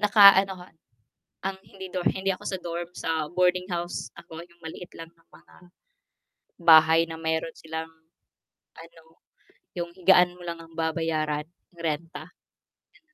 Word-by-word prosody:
Naka 205 -1 +9
ano 195 0 -4
'ko 180 0 -12 0.8
ang 195 0 -3
hindi 190 -1 -9
do 185 - -2
hindi 195 0 +1
ako - - -9
sa 190 - -3
dorm, 170 0 -4
sa 165 - 0 0.3
boarding 180 0 +2
house 175 +1 -4
ako, 160 - -12
yung 170 0 -25
maliit 175 +2 -9
lang 165 0 -9
na 165 - -31
mga - - -23 1.1
bahay 160 -1 +7
na 160 - -6
meron 160 0 -2
silang 160 0 -6 0.9
ano, 165 0 -14 0.7
yung 170 -1 -3
higaan 180 -1 +5
mo - - -13
lang 170 -1 -5
ang 165 0 -16
babayaran, 155 -2 -1 0.3
renta. 165 0 -4 0.5
Yan. - - -29
170 Hz, 145 wpm, -26 LUFS, 160-180 Hz, 1.1 s, Naka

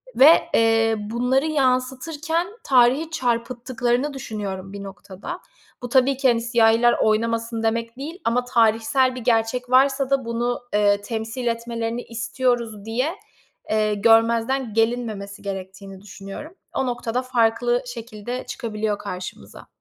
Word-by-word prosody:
ve, 300 +5 +6
eee, 225 0 +3
bunları 245 +6 0
yansıtırken 295 +4 0 0.2
tarihi 265 +5 +3
çarpıttıklarını 245 0 -1
düşünüyorum 200 -7 -6
bir 200 - -7
noktada. 195 0 -8 0.4
Bu, 245 - -4
tabii 260 +1 +3
ki, 270 - +2
hani, 230 -1 +2
"siyahiler 235 0 +4
oynamasın" 230 +1 0
demek 230 +1 -1
değil 315 +7 -7
ama 245 +2 +1
tarihsel 245 +3 +2
bir 255 - -6
gerçek 235 +1 0
varsa 270 +1 +4
da 275 -2 +1
bunu, 240 +1 -2
eee, 205 -1 +3
"temsil 225 +3 -4
etmelerini 230 0 -2
istiyoruz" 235 -2 -2
diye, 255 +10 -1 0.5
eee, 215 -1 +1
görmezden 230 +3 +3
gelinmemesi 225 -3 -1
gerektiğini 195 -1 -7
düşünüyorum. 200 - -9 0.2
O 265 - 0
noktada 245 0 -2
farklı 240 0 +1
şekilde 235 +1 -6
çıkabiliyor 215 -2 -3
karşımıza. 185 -3 -8
235 Hz, 120 wpm, -22 LUFS, 220-255 Hz, 0.5 s, ve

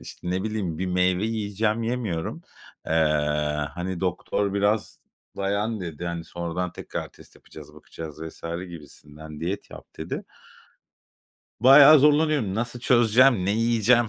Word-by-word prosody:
İşte 90 +7 -7
ne 95 +1 -1
bileyim, 100 -7 -3
bir 95 - -2
meyve 90 +2 +1
yiyeceğim, 110 0 -1
yemiyorum. 115 -9 -3 0.4
Eee, - - -2 0.8
hani, 90 0 -4
doktor 95 +2 -1
biraz 105 +2 0 0.4
dayan 100 +2 -1
dedi, 85 -1 -6
hani, 85 -1 -4
sonradan 85 +1 -4
tekrar - - -6
test - - -17
yapacağız, - - -14
bakacağız 80 -1 -10
vs. - - -14 0.3
gibisinden 75 -1 -11
diyet 90 +5 -4
yap - - -11
dedi. - - -5 1.4
Bayağı 140 +4 +9
zorlanıyorum. 150 -7 +3
Nasıl 120 +2 -3
çözeceğim, 120 -2 +4
ne 95 - +1
yiyeceğim, 115 +1 +3
100 Hz, 130 wpm, -25 LUFS, 90-115 Hz, 1.4 s, Bayağı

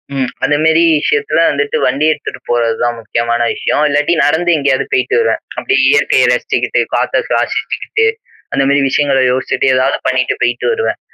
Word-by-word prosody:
ம். 130 -2 -1
அந்தமாரி 160 +3 +2 0.2
விஷயத்துல 440 - 0
வந்துட்டு 445 +2 -1
வண்டி 150 +2 0
எடுத்துட்டு 150 - -6
போறதுதான் 120 0 0
முக்கியமான 115 +1 -2
விஷயம். 150 - -1
இல்லாட்டி 150 +3 +1
நடந்து 170 +4 +1
எங்கயாவது 140 -2 0
போயிட்டு 405 +3 +1
வருவேன். 460 - 0 0.2
அப்பிடியே 400 - +2
இயற்கைய 435 - +3
ரசிச்சுக்கிட்டு, - - -1
காத்த - - 0
சுவாசிக்கிட்டு, 445 0 -1 0.5
அந்தமாரி 140 +1 +2
விஷயங்கள 140 0 +1
யோசிச்சுட்டு 130 - -1
எதாவது 130 - +1
பண்ணிட்டு 130 -1 0
போயிட்டு 120 0 -1
வருவேன். 465 0 -2
145 Hz, 140 wpm, -14 LUFS, 130-175 Hz, 0.5 s, இயற்கைய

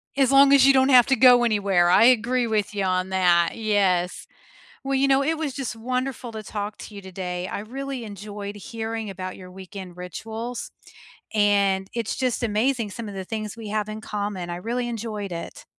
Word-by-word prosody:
As 270 -1 +3
long 275 0 +7
as 270 -1 +7
you 275 - +7
don't 265 +1 +4
have 250 -3 +7
to 270 - +3
go 250 -1 +7
anywhere, 200 -6 +2
I 185 - +6
agree 250 0 +3
with 215 -2 -1
you 200 - 0
on 185 0 0
that, 175 -2 +3
yes. 195 -5 0 0.6
Well, 275 0 -2
you 270 +1 +3
know, 270 0 +3
it 320 +2 0
was 290 -5 -2
just 265 -5 -4
wonderful 250 +1 -3
to 215 -1 -6
talk 205 +1 -5
to 215 - -10
you 200 - -8
today, 180 -1 -5
I - - -4
really 265 +2 -6
enjoyed 205 0 -7
hearing 225 +1 -5
about 185 -1 -6
your 185 -1 -11
weekend 185 -1 -10
rituals, 225 +6 -6 0.6
and 200 -2 +2
it's 230 -2 -2
just 250 -2 -1
amazing 225 0 0
some 220 +1 -6
of 200 - -8
the 190 -1 -5
things 215 0 -5
we 220 -2 -7
have 215 0 -2
in 215 0 -6
common. 200 -5 -4
I 175 - -4
really 240 +5 -3
enjoyed 215 -4 -5
it. 170 0 -7
215 Hz, 200 wpm, -24 LUFS, 190-245 Hz, 0.6 s, long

